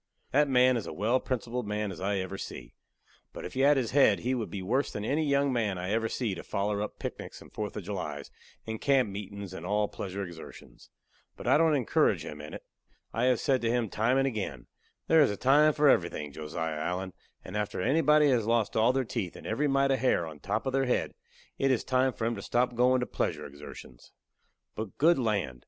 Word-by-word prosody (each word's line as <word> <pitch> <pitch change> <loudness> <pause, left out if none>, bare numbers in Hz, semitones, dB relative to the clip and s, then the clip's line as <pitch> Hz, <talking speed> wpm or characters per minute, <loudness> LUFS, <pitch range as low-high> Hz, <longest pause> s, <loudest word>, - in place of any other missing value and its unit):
That 145 +1 +3
man 125 -1 +4
is 115 - -5
a - - -5
well 115 +6 +1
principled 125 -2 -3
man 105 -1 -2
as 90 - -9
I 100 +2 0
ever 95 0 -3
see, - - -8 0.6
but - - -7
if - - -7
he 130 - -4
had 140 +1 +5
his 125 -4 -1
head 130 -8 +4
he 125 +2 0
would 120 -4 -2
be 95 -2 -5
worse 130 +9 0
than 105 - -4
any 150 +6 +1
young 140 -2 +2
man 110 -6 0
I 90 +2 -3
ever 115 +1 0
see 115 -6 -2
to 90 - -6
foller 100 +1 -2
up 105 - -5
picnics - - -7
and - - -16
4th 105 -1 -4
of 105 - -5
Julys 85 -7 -5 0.3
and 110 -1 -5
camp 135 -6 +3
meetin's 100 -1 -7
and 85 - -7
all 105 +3 +1
pleasure 100 0 -5
exertions. 85 -2 -12 0.5
But - - -9
I - - +4
don't 160 -2 +4
encourage 130 -5 +2
him 75 0 -7
in 75 - -8
it. - - -9 0.5
I 115 - +1
have 125 -3 +3
said 130 -2 +1
to 115 - 0
him 120 -2 0
time 115 +6 +1
and 135 - +3
again: 105 - -3 0.4
"There 160 -1 +5
is 145 - +5
a 105 - -3
time 150 +4 +5
for 150 0 +2
everything, 85 - +2
Josiah 80 0 -4
Allen, 90 +3 -3 0.3
and 95 - -8
after 105 0 -2
anybody 150 - +4
has 115 -4 +1
lost 115 -2 +1
all 115 +3 +4
their 135 -1 0
teeth 105 -6 -4
and - - -11
every 140 +7 0
mite 135 0 +2
of 135 - +1
hair 120 -8 +2
on 80 -2 -9
the - - -27
top 105 +4 -1
of 130 - -2
their 135 0 +2
head, 125 - 0 0.5
it 135 - +2
is 130 -3 +1
time 130 0 +2
for 115 - -4
'em 115 - 0
to - - -6
stop 125 +1 0
goin' 125 +1 +3
to - - 0
pleasure - - -2
exertions." 70 -3 -12 0.6
But 110 -2 -6
good 165 +2 +4
land! 100 - -1
115 Hz, 230 wpm, -29 LUFS, 95-130 Hz, 0.6 s, had